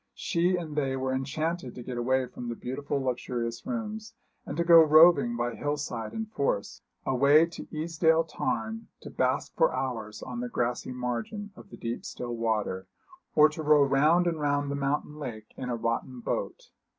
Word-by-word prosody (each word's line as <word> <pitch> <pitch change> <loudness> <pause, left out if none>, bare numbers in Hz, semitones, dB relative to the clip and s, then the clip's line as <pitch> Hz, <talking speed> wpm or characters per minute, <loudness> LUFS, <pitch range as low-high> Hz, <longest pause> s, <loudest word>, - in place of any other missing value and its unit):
She 175 +1 +1
and 160 -4 -5
they 135 -3 0
were 130 0 -1
enchanted 145 +2 -2
to 125 - -7
get 125 +1 -5
away 130 +2 +1
from 125 -1 -7
the 120 - -3
beautiful 140 +4 -3
luxurious 120 - -3
rooms, 220 -2 -4 0.3
and 145 - -5
to 170 - +2
go 170 -1 +9
roving 155 -5 +6
by 120 0 -1
hill 145 +4 -2
side 115 -6 -4
and 225 0 -4
force, 140 - -1 0.2
away 140 +5 +5
to 170 - -9
Easedale 160 +1 +2
Tarn, 225 +8 -3
to - - -9
bask - - 0
for - - +4
hours 110 -5 -4
on 125 -2 -5
the 125 0 -3
grassy 120 +2 -2
margin 125 - -4
of - - -14
the - - -11
deep 115 +1 -4
still 120 -1 -5
water, 110 -5 -1 0.5
or 150 0 +8
to 155 +1 -6
row 150 -1 +5
round 150 +6 +4
and 165 -2 0
round 145 -1 0
the - - -1
mountain 145 +2 -2
lake 110 -7 -7
in 125 - -5
a 120 - 0
rotten 115 +2 -2
boat. - - -4
140 Hz, 185 wpm, -28 LUFS, 120-160 Hz, 0.5 s, go